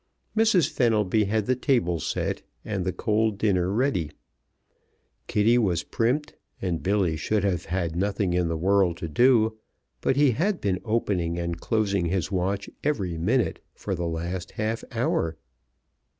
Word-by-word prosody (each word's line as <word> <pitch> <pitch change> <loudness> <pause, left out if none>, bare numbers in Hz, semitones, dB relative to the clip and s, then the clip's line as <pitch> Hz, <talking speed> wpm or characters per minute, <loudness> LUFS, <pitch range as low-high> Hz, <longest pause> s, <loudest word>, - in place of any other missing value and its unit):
Mrs. 215 -9 +4
Fenelby 110 - +2
had 105 +1 0
the 130 - +2
table 120 - +1
set - - -2 0.2
and 100 -4 -2
the 95 - +1
cold 110 +1 0
dinner 95 -4 +1
ready; 105 - 0 1.2
Kitty 115 +4 +3
was 90 -7 +1
primped; 135 - -1 0.3
and 90 -4 -2
Billy 95 -4 +1
should 100 +7 0
have 90 -4 0
had 85 -2 -2
nothing 100 0 0
in 90 -1 +1
the 80 0 -1
world 95 0 +2
to 85 - -4
do, 110 - +3 0.4
but - - +2
he 140 -1 +4
had 180 - 0
been 95 -3 -1
opening 95 -7 0
and 85 -1 -3
closing 100 -5 +1
his 90 +1 -1
watch 95 +1 -1 0.2
every 95 - -1
minute 110 +10 +1 0.2
for 100 - -4
the 85 -2 -2
last 85 +2 -4
half 110 +1 -2
hour. 80 -1 0
100 Hz, 150 wpm, -26 LUFS, 85-115 Hz, 1.2 s, Mrs